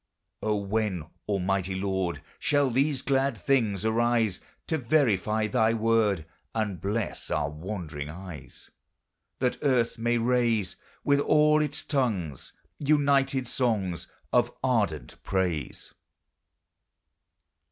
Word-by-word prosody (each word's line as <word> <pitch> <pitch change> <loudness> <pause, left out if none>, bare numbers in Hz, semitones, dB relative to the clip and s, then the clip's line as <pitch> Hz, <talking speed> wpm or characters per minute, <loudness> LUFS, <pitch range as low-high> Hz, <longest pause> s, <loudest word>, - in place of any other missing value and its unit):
O, 110 -1 +1
when, 100 -4 -1 0.2
Almighty 95 -1 0
Lord! 95 -5 -2 0.2
Shall 145 -3 +2
these 135 +2 +1
glad 135 0 +1
things 110 -8 +1
arise, 115 -3 +2 0.2
To 160 - -1
verify 110 - +2
thy 110 0 +2
word, 110 -6 +2 0.3
And 105 -6 -1
bless 105 +2 -2
our 70 - 0
wandering 75 -3 -5
eyes? 90 0 -10 0.7
That 125 -1 0
earth 125 -4 +1
may 120 +1 +2
raise, 115 -5 +1 0.3
With 140 0 +3
all 150 +1 +4
its 150 0 -1
tongues, 100 - -1 0.3
United 140 -3 +2
songs 105 - -1 0.3
Of 120 0 +3
ardent 100 - 0
praise. 90 -8 -2
110 Hz, 105 wpm, -27 LUFS, 95-130 Hz, 0.7 s, all